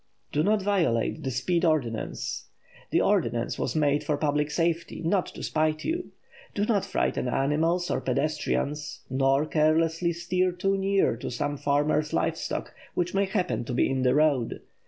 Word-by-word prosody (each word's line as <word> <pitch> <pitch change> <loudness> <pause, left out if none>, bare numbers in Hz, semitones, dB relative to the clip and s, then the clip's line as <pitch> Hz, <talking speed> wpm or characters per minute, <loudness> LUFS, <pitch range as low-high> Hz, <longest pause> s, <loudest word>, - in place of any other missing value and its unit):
Do 150 - +1
not 205 +3 +2
violate 165 - +1
the 135 - -2
speed 170 +8 0
ordinance. 115 - -1 0.4
The - - +2
ordinance - - +1
was - - -2
made 145 -1 +2
for 150 - 0
public 150 0 0
safety, 170 +2 -1
not 180 +2 +2
to - - -9
spite 155 0 0
you. 345 +2 -2 0.4
Do 205 - +1
not 210 -4 +1
frighten - - -1
animals 160 +8 +1
or - - 0
pedestrians, 150 +2 -1
nor 135 +2 +2
carelessly 165 +2 +2
steer 180 +2 0
too 195 +2 0
near 195 - +2
to - - -5
some 145 +4 -2
farmer's 145 +2 +1
live - - +1
stock - - -4 0.2
which 175 0 -1
may 200 +1 +2
happen 190 - -1
to 125 - -3
be - - +3
in 135 -1 0
the 130 +1 +3
road. 145 -6 +2
155 Hz, 165 wpm, -27 LUFS, 140-180 Hz, 0.4 s, be